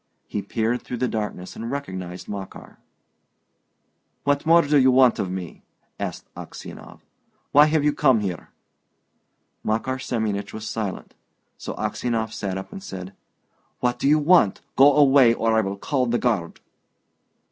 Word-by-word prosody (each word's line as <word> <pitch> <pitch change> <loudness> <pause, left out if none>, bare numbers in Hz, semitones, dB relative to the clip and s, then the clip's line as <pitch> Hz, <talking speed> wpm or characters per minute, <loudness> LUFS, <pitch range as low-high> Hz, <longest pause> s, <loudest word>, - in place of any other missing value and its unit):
He 105 - -3
peered 115 +4 -1
through 125 - -6
the 125 +2 0
darkness 105 -5 -4
and 115 +1 -6
recognised 95 -10 -6
Makar. 100 -2 -8 1.4
"What 145 +2 0
more 170 +1 +6
do 145 0 +3
you 130 0 +5
want 130 -1 +4
of 95 - -1
me?" 90 -2 -6 0.4
asked - - -5
Aksionov. - - -10 0.5
"Why 145 +2 +7
have 155 -1 +1
you 150 0 +2
come 130 -7 +3
here?" 90 -5 -5 1.1
Makar 130 +4 -1
Semyonich 105 -5 -3
was 110 0 -6
silent. 110 -4 -5 0.5
So - - -6
Aksionov 115 -2 -2
sat 95 -2 -3
up 95 - -8
and 195 - -8
said, 95 - -8 0.7
"What 120 0 0
do - - 0
you 150 +2 +5
want? 150 - +4
Go 140 +2 +7
away, 135 -5 +6
or 115 0 +1
I 110 - +4
will 100 -1 -4
call 130 +3 -1
the 120 +1 +1
guard!" 105 -10 -1
115 Hz, 150 wpm, -23 LUFS, 100-140 Hz, 1.4 s, Why